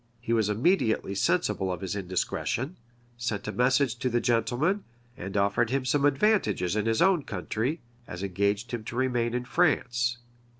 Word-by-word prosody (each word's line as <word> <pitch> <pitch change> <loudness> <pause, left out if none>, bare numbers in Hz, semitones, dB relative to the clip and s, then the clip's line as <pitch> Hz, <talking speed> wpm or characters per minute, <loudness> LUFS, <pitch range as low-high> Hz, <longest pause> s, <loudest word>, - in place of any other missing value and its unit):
He 115 -1 -2
was 110 -3 +2
immediately 110 - +1
sensible 95 -1 +1
of 90 - -4
his 95 0 -3
indiscretion; 105 - -2 0.4
sent 115 -4 -3
a - - -1
message 125 +1 +2
to 130 +1 -1
the 120 0 +1
gentleman; 125 - +1 0.3
and 95 +3 -5
offered 100 +4 +2
him 135 +1 -1
some 140 +3 +2
advantages 135 - +2
in 105 +1 0
his 115 +7 +3
own 190 -3 +4
country, 110 - -3 0.3
as 90 +2 -6
engaged 100 +4 -1
him 120 -3 -4
to 115 - -6
remain 120 -2 0
in 125 0 -2
France. 125 -6 +1
120 Hz, 165 wpm, -27 LUFS, 105-130 Hz, 0.4 s, own